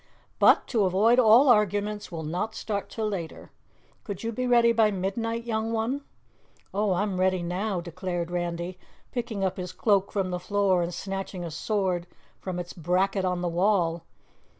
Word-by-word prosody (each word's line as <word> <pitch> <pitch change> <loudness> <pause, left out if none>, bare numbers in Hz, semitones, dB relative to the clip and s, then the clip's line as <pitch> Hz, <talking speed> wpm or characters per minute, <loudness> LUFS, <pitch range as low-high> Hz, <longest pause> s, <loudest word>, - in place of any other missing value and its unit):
"But - - +6
to 220 -6 +2
avoid 210 +7 +4
all 240 +4 +7
arguments 210 -2 +2
we'll 165 -2 -5
not 180 +8 -3
start 205 -2 -3
till 220 -1 -2
later. 180 -6 -5 0.5
Could 200 -1 -6
you 230 - -1
be 255 +3 -2
ready 235 -1 +5
by 225 -2 +4
midnight, 225 +4 -2
young 225 -1 -2
one?" 230 +5 -1 0.7
"Oh, 205 0 +1
I'm 190 0 -1
ready 185 -1 +2
now," 185 +2 -2
declared 175 0 -4
Randy, 175 +1 -3 0.3
picking 235 -5 -3
up 190 - -1
his 180 -1 -5
cloak 200 -3 +1
from 195 -3 -1
the 180 - -2
floor 195 -1 +1
and 170 +1 -2
snatching 195 -1 -5
a 165 - -6
sword 180 0 -1 0.3
from 185 -2 -5
its 175 -1 -5
bracket 185 +3 0
on 180 -1 -1
the - - 0
wall. 170 -2 +1
195 Hz, 170 wpm, -27 LUFS, 180-220 Hz, 0.7 s, all